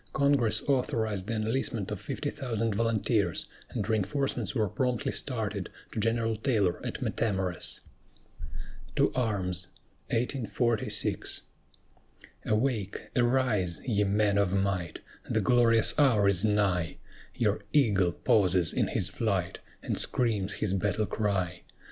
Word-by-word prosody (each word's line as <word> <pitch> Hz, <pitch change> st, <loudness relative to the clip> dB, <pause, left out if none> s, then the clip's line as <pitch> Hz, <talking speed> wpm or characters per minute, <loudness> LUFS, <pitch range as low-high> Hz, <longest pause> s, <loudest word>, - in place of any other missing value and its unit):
Congress 135 Hz, -6 st, +3 dB
authorized 110 Hz, -7 st, 0 dB
the 115 Hz, -, -2 dB
enlistment 110 Hz, -2 st, -1 dB
of -, -, -4 dB
fifty -, -, -3 dB
thousand 115 Hz, -4 st, -2 dB
volunteers, 110 Hz, -4 st, 0 dB, 0.2 s
and 100 Hz, -, -3 dB
reinforcements 110 Hz, +7 st, -1 dB
were 110 Hz, -4 st, +2 dB
promptly 125 Hz, +2 st, -1 dB
started -, -, -2 dB, 0.2 s
to -, -, -4 dB
General 115 Hz, +1 st, +1 dB
Taylor 105 Hz, -7 st, 0 dB
at -, -, -4 dB
Matamoras. 95 Hz, -5 st, -2 dB, 1.1 s
TO -, -, +2 dB
ARMS 95 Hz, -7 st, 0 dB, 2.8 s
Awake! 110 Hz, -3 st, 0 dB
arise, 120 Hz, -8 st, +1 dB
ye 105 Hz, -5 st, +2 dB
men 100 Hz, 0 st, +2 dB
of 100 Hz, -2 st, +1 dB
might! 95 Hz, -4 st, -1 dB, 0.3 s
The 110 Hz, -, +1 dB
glorious 115 Hz, 0 st, +4 dB
hour 115 Hz, -9 st, +4 dB
is 95 Hz, -2 st, +2 dB
nigh, 100 Hz, -6 st, +1 dB, 0.4 s
Your -, -, +1 dB
eagle 100 Hz, -11 st, +3 dB
pauses 90 Hz, -1 st, +2 dB
in -, -, +1 dB
his 90 Hz, -, 0 dB
flight, 95 Hz, -3 st, -1 dB, 0.2 s
And -, -, -2 dB
screams 105 Hz, -5 st, 0 dB
his 105 Hz, -3 st, -1 dB
battle 105 Hz, +2 st, 0 dB
cry. 95 Hz, -5 st, -1 dB
105 Hz, 115 wpm, -29 LUFS, 95-115 Hz, 2.8 s, glorious